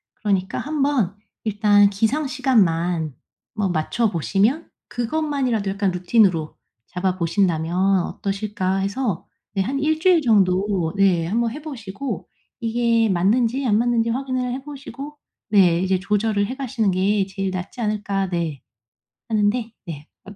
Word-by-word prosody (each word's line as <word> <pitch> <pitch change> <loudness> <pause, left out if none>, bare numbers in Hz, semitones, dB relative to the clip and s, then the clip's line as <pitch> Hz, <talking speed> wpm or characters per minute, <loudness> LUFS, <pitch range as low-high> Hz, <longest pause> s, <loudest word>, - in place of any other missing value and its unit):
그러니까 195 -3 -1
한번 280 - 0 0.3
일단 205 -1 +4
기상시간만 200 - +1 0.4
뭐 205 -3 0
맞춰 175 +7 0
보시면 205 - 0 0.2
'그것만이라도 250 -4 -1
약간 200 -1 0
루틴으로 180 -3 +2 0.3
잡아 185 0 -2
보신다면 180 +1 +1
어떠실까?' 195 -2 -2
해서 200 0 -2 0.3
네 195 - 0
한 270 +8 -1
1 310 +2 +1
주일 355 -1 +4
정도 190 - +2
네 190 -4 +3
한번 230 +4 0
해 295 +5 -7
보시고 265 -3 -6 0.3
이게 230 -1 +2
맞는지 230 +8 +2
안 210 -2 +3
맞는지 230 0 +1
확인을 255 0 -2
해 265 +1 -5
보시고 290 +1 -9 0.3
네 180 -5 +5
이제 190 0 +1
조절을 205 +1 0
해 255 - -5
가시는 245 -6 -1
게 195 +2 +1
'제일 195 -1 -3
낫지 185 +6 -6
않을까?' 205 -3 -1
네 165 -6 -3 0.7
하는데 220 +2 +1
네 155 -3 -8 0.2
어떠시 205 +1 -12
205 Hz, 290 characters per minute, -22 LUFS, 190-245 Hz, 0.7 s, 네